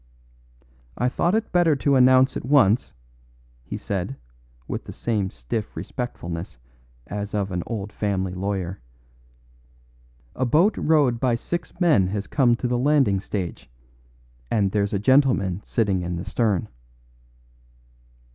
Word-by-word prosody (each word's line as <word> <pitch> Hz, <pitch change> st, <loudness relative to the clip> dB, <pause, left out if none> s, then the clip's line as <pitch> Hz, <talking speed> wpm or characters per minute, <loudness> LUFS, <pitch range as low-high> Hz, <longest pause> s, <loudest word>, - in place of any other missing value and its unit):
"I 125 Hz, +2 st, +1 dB
thought 175 Hz, +9 st, +1 dB
it 220 Hz, 0 st, -1 dB
better 175 Hz, -4 st, +4 dB
to 140 Hz, 0 st, +2 dB
announce 130 Hz, +1 st, +5 dB
at -, -, -4 dB
once," 125 Hz, -5 st, +3 dB, 0.7 s
he -, -, -6 dB
said, 100 Hz, +6 st, -3 dB, 0.5 s
with -, -, -4 dB
the -, -, -8 dB
same 105 Hz, -5 st, -1 dB
stiff 65 Hz, -, -5 dB
respectfulness 85 Hz, -, -5 dB, 0.5 s
as 105 Hz, +8 st, -5 dB
of 100 Hz, -2 st, -1 dB
an 90 Hz, -1 st, -2 dB
old 105 Hz, -3 st, -5 dB
family 95 Hz, -3 st, -1 dB
lawyer, 95 Hz, -2 st, -3 dB, 1.5 s
"a 130 Hz, -, -1 dB
boat 165 Hz, -, +3 dB
rowed 145 Hz, -7 st, +2 dB
by 125 Hz, -2 st, +2 dB
six 175 Hz, +8 st, -5 dB
men 150 Hz, -, +4 dB
has 100 Hz, +1 st, -3 dB
come 125 Hz, -5 st, +3 dB
to 125 Hz, -, -3 dB
the 120 Hz, 0 st, 0 dB
landing 135 Hz, -8 st, +3 dB
stage, 95 Hz, -, -5 dB, 0.8 s
and 100 Hz, -4 st, +1 dB
there's 100 Hz, -1 st, 0 dB
a -, -, +2 dB
gentleman 105 Hz, -5 st, +3 dB
sitting 100 Hz, -5 st, 0 dB
in 90 Hz, 0 st, -3 dB
the 85 Hz, -, -5 dB
stern." 105 Hz, -7 st, 0 dB
110 Hz, 135 wpm, -24 LUFS, 95-130 Hz, 1.5 s, announce